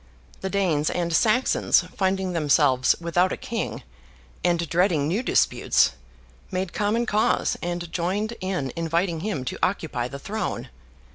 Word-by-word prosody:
The 190 - -3
Danes 175 -7 +1
and 170 -1 -1
Saxons, 235 +8 +3
finding 190 -1 0
themselves 145 -5 +3
without 175 +2 +1
a - - -2
King, - - -4 0.6
and 170 -1 +1
dreading 165 -3 +2
new 190 +9 0
disputes, - - +3 0.6
made 185 -1 -3
common 215 +3 +1
cause, 215 -1 +1
and 175 -1 -4
joined 195 +6 -1
in 180 -9 -2
inviting 165 +1 0
him 170 -8 -3
to - - -4
occupy 155 -10 -1
the 140 - -7
Throne. 205 +7 -4
175 Hz, 135 wpm, -24 LUFS, 160-195 Hz, 0.6 s, Saxons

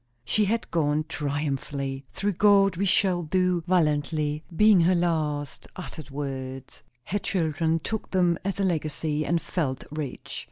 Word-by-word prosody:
She 210 - +2
had 225 +3 -1
gone 155 -2 +1
triumphantly. 140 -2 -3
"Through 205 +1 -1
God 195 0 +5
we 195 +4 0
shall 180 -1 +3
do 180 +1 +1
valiantly" 150 -3 +1
being 210 0 +6
her 180 +2 +4
last 155 -4 -1
uttered 160 -5 -8
words. 135 -2 -6 0.2
Her 205 +9 -2
children 160 -3 0
took 215 +7 -4
them 175 -3 +2
as 195 +1 -2
a - - +2
legacy, 155 -3 -1
and 170 +2 +1
felt 140 -7 -2
rich. 150 -4 -5
160 Hz, 145 wpm, -26 LUFS, 145-185 Hz, 0.2 s, being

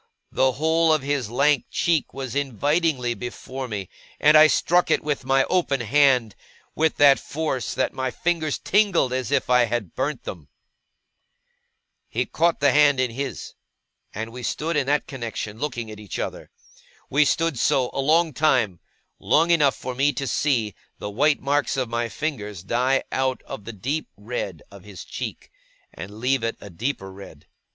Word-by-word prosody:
The 130 0 +2
whole 160 +3 +2
of 155 -3 +2
his 140 -5 -1
lank 140 +2 +2
cheek 165 -4 0
was 135 -2 -6
invitingly 140 0 0
before 130 +2 -6
me, 100 -5 -5 0.3
and 150 +1 +5
I 155 0 +9
struck 175 +3 +2
it - - +2
with 145 -3 -2
my 135 0 +3
open 155 -7 0
hand 125 -3 +3 0.4
with 160 0 +1
that 140 -1 +6
force 150 -5 -3
that - - 0
my 130 0 -2
fingers 160 +1 -1
tingled 190 -10 +2
as 130 -3 -2
if - - +1
I 125 -1 +4
had 115 -6 -3
burnt 135 0 -2
them. 80 -6 -8 1.6
He 125 +3 -1
caught 165 +2 0
the 140 -1 +5
hand 145 -2 +4
in 130 -2 +1
his, 135 +3 -5 0.6
and 110 +2 -5
we 125 +2 -8
stood 160 +7 -2
in 140 -3 +1
that 145 +1 +1
connexion, 115 -4 -6
looking 120 -6 -4
at 105 - -10
each 105 -3 -7
other. - - -5 0.6
We 145 +3 +5
stood 165 -2 0
so, 125 -2 +2
a - - -1
long 160 +3 +3
time; 125 - +2 0.4
long 165 +3 +3
enough 150 -6 +4
for 130 - -6
me 140 +3 +2
to 135 +2 -3
see 120 -4 0 0.2
the 105 - -6
white 145 +7 +2
marks 140 -1 0
of 130 -3 -1
my 120 0 -2
fingers 105 - -4
die 125 +6 +1
out 130 -1 -1
of 100 - -8
the 115 - -6
deep 135 +10 -3
red 105 -6 -5
of 100 -2 -13
his 100 -3 -10
cheek, - - -7 0.4
and 100 +3 -9
leave 130 +2 +1
it 115 - -2
a 100 - -11
deeper 95 -1 -4
red. 80 -6 -13
130 Hz, 175 wpm, -23 LUFS, 115-150 Hz, 1.6 s, I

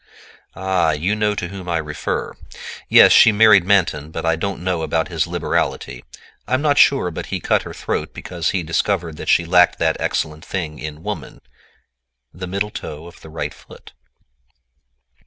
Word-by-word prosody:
"Ah, 95 -3 +1
you 80 +7 -1
know 105 -1 0
to 90 -3 -4
whom 95 -2 -8
I 85 - +1
refer. 75 -1 -4 0.6
Yes, - - +8
she 110 - +7
married 105 -3 +6
Manton, 90 -6 +1
but 80 +1 -5
I 80 0 +2
don't 95 +1 -4
know 90 -3 -1
about 80 +1 -1
his 80 -4 -1
liberality; - - -2 0.4
I'm 130 +1 +1
not 145 -1 +2
sure 135 -11 +4
but - - -6
he - - -3
cut - - +1
her - - -9
throat - - -3
because 85 -2 -4
he 95 -3 -1
discovered 80 0 -1
that - - -6
she 85 - +3
lacked 90 +1 +4
that 80 -1 0
excellent 75 0 -2
thing 80 -5 -5
in 75 +1 -8
woman, - - -6 0.9
the 90 +1 -7
middle 100 +3 -2
toe 75 -3 -8
of 85 - -14
the 80 - -12
right 80 - -5
foot." - - -16
85 Hz, 175 wpm, -20 LUFS, 80-100 Hz, 0.9 s, Yes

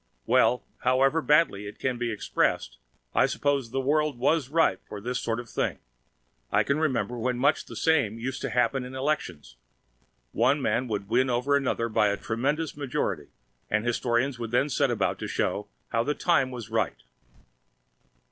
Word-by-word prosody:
Well, 125 - +3 0.2
however 135 +5 +3
badly 150 -11 +3
it 100 - -9
can 130 -2 -2
be 120 -1 -1
expressed, 80 - -1 0.3
I - - +4
suppose 140 -4 0
the 135 +3 -2
world 150 +1 +1
was 140 +2 +1
ripe 155 - +2
for 105 - -6
this 125 +4 -3
sort 115 0 -2
of 120 - -7
thing. - - -2 0.7
I - - +4
can 140 +2 0
remember 125 -6 0
when 125 +1 -1
much 140 +5 +2
the - - -10
same 145 -10 +2
used 130 +3 -4
to - - -2
happen 125 +2 +1
in 125 +1 -8
elections. 90 - -3 0.7
One 130 +6 +2
man 130 -2 0
would 105 -3 -3
win 125 +4 +2
over 125 +4 +2
another 130 -4 0
by 105 -2 +2
a 100 0 0
tremendous 140 +10 -2
majority, 110 - -2 0.4
and 105 +2 0
historians 120 +2 0
would 115 -1 -4
then 125 +5 +2
set - - +2
about - - 0
to - - -4
show 105 0 -1 0.2
how 115 0 +1
"the 150 +4 -1
time 140 -5 +2
was 120 -4 -8
right." 110 -1 -1
125 Hz, 175 wpm, -27 LUFS, 115-140 Hz, 0.7 s, I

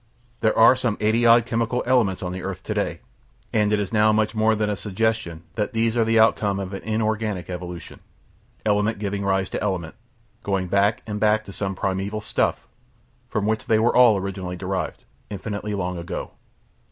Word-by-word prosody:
There 110 -2 +1
are 115 +3 +7
some 125 -4 -1
eighty 110 +2 +2
odd 115 0 +6
chemical 115 +1 -1
elements 115 -8 +2
on 90 - -3
the 90 0 -5
earth 95 -2 -5
to - - -3
day, - - -2 0.5
and 105 -1 +2
it 105 - +2
is 100 +1 -3
now 110 0 +4
much 110 0 +1
more 110 0 +2
than 105 0 0
a 105 - -1
suggestion 105 -4 -2
that 110 +2 -2
these 115 0 +1
are 115 - +3
the 115 0 +2
outcome 105 -3 +3
of 95 0 -5
an 95 - -5
inorganic 110 -4 -2
evolution, 90 -2 -7 0.7
element 105 +1 +1
giving 100 -1 -3
rise 95 -1 +1
to - - -4
element, 90 -5 -2 0.5
going 95 -2 -1
back 100 +3 +2
and 105 -1 -4
back 110 0 +3
to 100 - -9
some 95 -1 -3
primeval 95 +2 -2
stuff, 105 - -1 0.6
from 105 -2 -1
which 110 +1 -1
they 110 - +4
were 115 +2 +2
all 120 -4 +6
originally 95 -2 -4
derived, 95 +1 -4 0.3
infinitely 105 +1 -4
long 90 -2 -3
ago. 85 - -5
105 Hz, 190 wpm, -23 LUFS, 95-110 Hz, 0.7 s, are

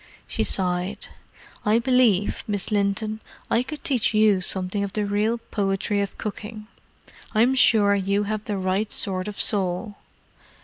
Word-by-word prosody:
She - - -1
sighed. 180 +1 0 0.5
"I 210 +2 +3
believe, 235 -5 +2
Miss 205 0 -3
Linton, 210 +1 0 0.3
I 230 - +3
could 295 +4 -7
teach 255 -8 +1
you 215 -3 +4
something 185 +2 0
of 200 0 -5
the 210 -1 -1
real 210 +3 0
poetry 205 -2 -1
of 200 - -4
cooking. 215 +1 -6 0.7
I'm 235 +4 +4
sure 215 -5 +4
you 200 +1 0
have 215 +1 -4
the 205 -2 -2
right 190 +3 -1
sort 185 0 0
of 210 - -7
soul!" 200 +1 0
205 Hz, 145 wpm, -24 LUFS, 195-220 Hz, 0.7 s, you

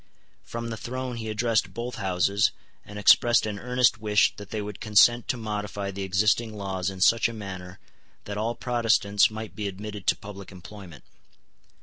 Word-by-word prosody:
From 115 0 -6
the 110 - -5
throne 130 +2 -5
he 110 -1 -5
addressed 110 -3 0
both 120 +2 -5
Houses, 100 +1 +1 0.3
and 105 - -10
expressed 115 +3 +5
an 105 -2 -4
earnest 125 0 +2
wish 105 -1 +2
that 105 -1 -10
they 110 - -3
would 105 -1 -6
consent 115 +2 +4
to 125 - -1
modify 105 -2 -4
the 100 +1 -6
existing 105 +4 +1
laws 95 -2 -3
in 95 -1 -8
such 115 +4 +4
a - - -7
manner 95 -3 -8 0.5
that 100 - -5
all 110 +3 -2
Protestants 115 -4 +2
might 110 0 -8
be 105 -2 -3
admitted 100 0 -7
to - - +4
public 100 -1 -10
employment. 90 -3 -12
105 Hz, 175 wpm, -26 LUFS, 100-115 Hz, 0.5 s, expressed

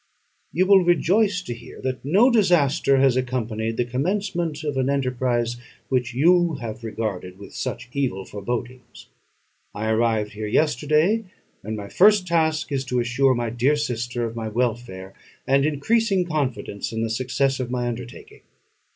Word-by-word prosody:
You 185 +3 +2
will 190 -1 +6
rejoice 180 +3 +2
to 120 - -5
hear 120 0 -12
that 130 -1 -3
no 200 - +4
disaster 170 - +3
has 135 -2 +4
accompanied 115 -3 -2
the 120 - +1
commencement 165 - -2
of 145 -3 -2
an 130 0 0
enterprise 125 -3 0 0.3
which 125 -2 -1
you 170 +3 +4
have 115 -3 -7
regarded 105 -5 -4
with 100 - -12
such - - -4
evil 125 -9 -2
forebodings. 120 +4 -6 0.7
I 110 +2 -1
arrived 110 -2 +1
here 105 0 -5
yesterday; 155 - +2 0.4
and 110 +2 -4
my 100 -1 -6
first 205 - +4
task 160 -3 0
is 135 -1 -1
to 125 0 -1
assure 125 +2 +2
my 120 -1 -2
dear 125 +5 +2
sister 120 -4 -2
of 115 0 -5
my 115 -1 -4
welfare, 110 -5 -3 0.3
and 135 +2 +3
increasing 195 +6 +1
confidence 130 -11 -3
in 110 0 -2
the 115 - -1
success 130 +3 0
of 125 -2 -3
my 125 -1 -2
undertaking. 120 0 -8
130 Hz, 155 wpm, -23 LUFS, 115-155 Hz, 0.7 s, will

